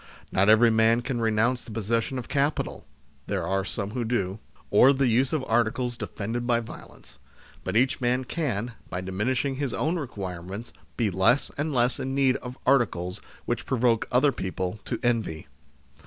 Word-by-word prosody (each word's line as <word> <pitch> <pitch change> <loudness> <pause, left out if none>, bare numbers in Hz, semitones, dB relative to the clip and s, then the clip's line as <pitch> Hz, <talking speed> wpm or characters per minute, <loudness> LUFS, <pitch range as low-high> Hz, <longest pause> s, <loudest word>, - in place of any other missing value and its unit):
Not 100 +2 +3
every 115 +2 +6
man 115 +1 +4
can 120 -2 -2
renounce 115 +3 +1
the - - -13
possession 115 +4 -1
of 125 - -5
capital 145 +2 -1 0.4
(there - - -1
are 95 0 0
some 100 +1 -4
who 120 +1 -2
do), 110 -4 -1 0.3
or 130 +7 +7
the 135 0 +1
use 125 +2 +2
of 155 -4 0
articles 120 +2 +1
defended 120 0 -4
by 120 -2 +3
violence, 115 - -11 0.4
but 95 +3 0
each 130 +2 +2
man 125 +1 +1
can, 125 -6 -2 0.2
by 90 - -3
diminishing 125 +9 -1
his 140 -3 -2
own 170 +3 0
requirements, 100 - -6 0.2
be 110 -4 +1
less 105 +9 +2
and 150 +2 -2
less 125 -2 +1
in 135 +1 -3
need 135 -2 +3
of 125 0 -8
articles 105 -8 +1 0.2
which 120 - -2
provoke 120 -3 +2
other 135 +3 +4
people 95 -2 -4
to 120 - -2
envy. 115 -10 0
120 Hz, 170 wpm, -26 LUFS, 105-130 Hz, 0.4 s, or